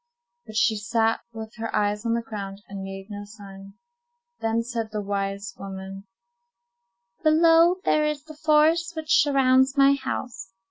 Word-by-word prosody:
But 215 - -10
she 220 0 +2
sat 225 +2 +1
with 220 0 -8
her 225 0 -4
eyes 210 +2 0
on 230 - +1
the 235 - -2
ground, 200 -2 -7
and 195 -1 -7
made 195 0 -7
no 205 0 -6
sign. 195 -2 -12 0.6
Then 225 +1 0
said 230 -2 -4
the 210 - -3
wise 200 -1 -3
woman:— 195 0 -8 1.1
"Below 330 +2 +5
there 305 - +3
is 300 -2 -3
the 310 0 -11
forest 320 +2 +2
which 315 0 +3
surrounds 265 -1 +3
my 275 0 +6
house. 190 -8 -5
225 Hz, 150 wpm, -25 LUFS, 200-280 Hz, 1.1 s, my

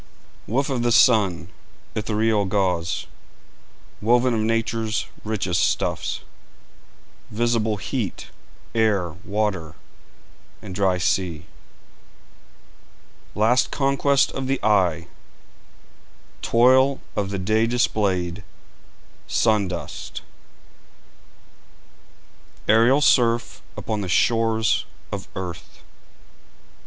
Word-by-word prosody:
Woof 135 +5 0
of 125 -3 -1
the 120 0 +1
sun, 100 -7 +4 0.4
ethereal 110 -1 0
gauze, 90 -4 -1 1.0
Woven 120 +3 +3
of 115 - 0
Nature's 110 -1 -1 0.2
richest 95 -6 -1
stuffs, - - -1 1.1
Visible 110 -1 0
heat, 110 0 -4 0.4
air 105 -6 +1
water, 100 -6 -2 0.8
and 95 - -9
dry 95 -1 +1
sea, 90 -3 -1 1.9
Last 115 +4 +3
conquest 140 0 +2
of 135 -1 -4
the 135 0 0
eye; 90 -6 +2 1.4
Toil 130 +3 +4 0.2
of 100 -2 -1
the 100 - -3
day 110 +4 +1
displayed 100 -6 0 0.8
sun 110 -3 +2
dust, 90 -1 -7 2.4
Aerial 115 +6 +5
surf 120 -5 +2 0.2
upon 110 -2 -3
the 95 - -4
shores 115 +2 +2 0.3
of - - -5
earth. 90 -3 -8
110 Hz, 85 wpm, -23 LUFS, 95-120 Hz, 2.4 s, Aerial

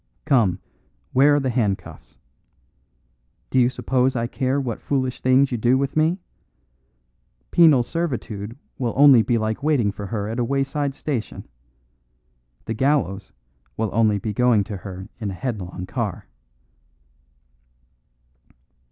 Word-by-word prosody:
Come, 110 -10 +3 0.6
where 145 +3 +5
are - - +3
the 130 -2 -1
handcuffs? 105 -5 -3 1.3
Do 130 - +3
you 120 -1 +4
suppose 130 0 0
I 115 -1 0
care 130 +3 -1
what 125 -5 -4
foolish 130 -2 -2
things 130 +2 +3
you 120 - -2
do 120 +4 +3
with 140 +1 -2
me? 160 +3 +2 1.3
Penal 155 -7 +6
servitude 120 -8 -4 0.2
will 120 -3 -2
only 140 -4 +8
be 120 +1 +1
like 110 0 -2
waiting 140 -9 +2
for 100 0 -7
her 105 -1 -3
at 115 +3 -4
a - - +2
wayside 135 +2 -1
station. 135 -8 -4 1.2
The 115 - -3
gallows 115 -6 0 0.5
will 110 -3 -1
only 110 -2 +3
be 105 +1 -4
going 120 -2 +3
to 100 0 -6
her 95 0 -8
in 105 -3 -3
a 95 - -5
headlong 95 -7 -5
car." - - -4
125 Hz, 135 wpm, -22 LUFS, 105-135 Hz, 1.3 s, only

